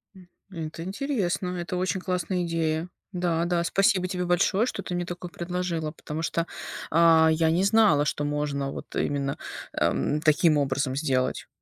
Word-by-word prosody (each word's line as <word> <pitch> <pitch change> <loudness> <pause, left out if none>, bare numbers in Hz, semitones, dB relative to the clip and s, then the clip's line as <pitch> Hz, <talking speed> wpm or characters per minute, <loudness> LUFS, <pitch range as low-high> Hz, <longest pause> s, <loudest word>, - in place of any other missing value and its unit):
М. 185 -2 -15 0.2
Это 165 -2 -6
интересно. 190 -4 -2
Это 175 +1 -3
очень 185 +1 0
классная 180 0 -1
идея. 165 0 -1 0.2
Да, 175 -2 0
да. 175 -1 +1
Спасибо 195 +2 +2
тебе 180 0 -2
большое, 190 +5 +2
что 250 - -3
ты 180 - -4
мне 175 0 -1
такое 175 0 -6
предложила, 175 -3 -3
потому 155 0 -6
что, 165 +1 -1 0.4
а, 160 0 +6
я 160 0 +2
не 175 +3 +2
знала, 200 -8 +4
что 145 - -1
можно 145 -2 -1
вот - - -8
именно, 140 -1 -1 0.4
эм, 150 - +1
таким 155 0 +4
образом 135 -1 0
сделать. 135 -3 0
170 Hz, 160 wpm, -26 LUFS, 155-180 Hz, 0.4 s, а